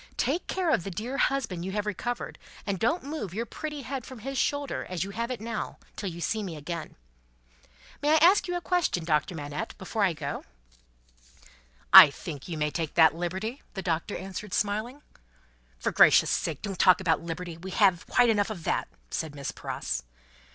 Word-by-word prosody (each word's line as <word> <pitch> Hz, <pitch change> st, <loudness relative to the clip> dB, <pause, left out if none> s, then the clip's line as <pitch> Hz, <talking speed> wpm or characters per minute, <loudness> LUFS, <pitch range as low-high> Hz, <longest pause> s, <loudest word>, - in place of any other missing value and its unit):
Take 300 Hz, +8 st, 0 dB
care 365 Hz, -4 st, 0 dB
of 175 Hz, -, +2 dB
the 195 Hz, -, -4 dB
dear 225 Hz, +9 st, -4 dB
husband 225 Hz, -11 st, 0 dB
you 190 Hz, +1 st, -4 dB
have 210 Hz, 0 st, -1 dB
recovered, 240 Hz, +4 st, -4 dB, 0.3 s
and 200 Hz, -3 st, -2 dB
don't 300 Hz, +11 st, +1 dB
move 275 Hz, -, -5 dB
your 230 Hz, +2 st, -1 dB
pretty 300 Hz, +4 st, -6 dB
head 260 Hz, 0 st, -4 dB
from 260 Hz, -, -10 dB
his 270 Hz, +5 st, -6 dB
shoulder 285 Hz, +2 st, -1 dB
as 180 Hz, -3 st, -2 dB
you 195 Hz, -, -6 dB
have 230 Hz, +3 st, -3 dB
it 255 Hz, -, -3 dB
now, 230 Hz, +2 st, -4 dB, 0.2 s
till 200 Hz, -, -3 dB
you 170 Hz, 0 st, -8 dB
see 215 Hz, +5 st, -1 dB
me 185 Hz, -5 st, -5 dB
again! 160 Hz, +2 st, -6 dB, 1.1 s
May 295 Hz, +1 st, +3 dB
I -, -, +7 dB
ask 355 Hz, +5 st, +5 dB
a 355 Hz, 0 st, -1 dB
question, 340 Hz, -, 0 dB
Doctor 155 Hz, +1 st, +1 dB
Manette, 145 Hz, -1 st, -5 dB
before 210 Hz, +2 st, -2 dB
I 185 Hz, -3 st, +3 dB
go?" -, -, -5 dB, 1.5 s
"I -, -, +13 dB
think 145 Hz, 0 st, -8 dB
you 170 Hz, -3 st, -4 dB
may 150 Hz, 0 st, 0 dB
take 160 Hz, -2 st, -3 dB
that 160 Hz, -3 st, +7 dB
liberty," 190 Hz, -, -4 dB
the 195 Hz, -, -4 dB
Doctor 170 Hz, +3 st, -1 dB
answered, 195 Hz, +1 st, -6 dB
smiling. 215 Hz, +7 st, -1 dB, 0.7 s
"For -, -, -1 dB
gracious -, -, +6 dB
sake, 155 Hz, -4 st, -2 dB
don't 195 Hz, -4 st, -4 dB
talk 180 Hz, -1 st, +6 dB
about 170 Hz, -4 st, +1 dB
Liberty; 170 Hz, 0 st, -6 dB
we 185 Hz, +3 st, -8 dB
have 190 Hz, -3 st, +3 dB
quite 245 Hz, -2 st, +4 dB
enough 205 Hz, -1 st, +1 dB
of 180 Hz, -7 st, -6 dB
that," -, -, 0 dB, 0.2 s
said 155 Hz, -2 st, -3 dB
Miss 140 Hz, -1 st, -4 dB
Pross. -, -, -4 dB
200 Hz, 190 wpm, -28 LUFS, 170-245 Hz, 1.5 s, I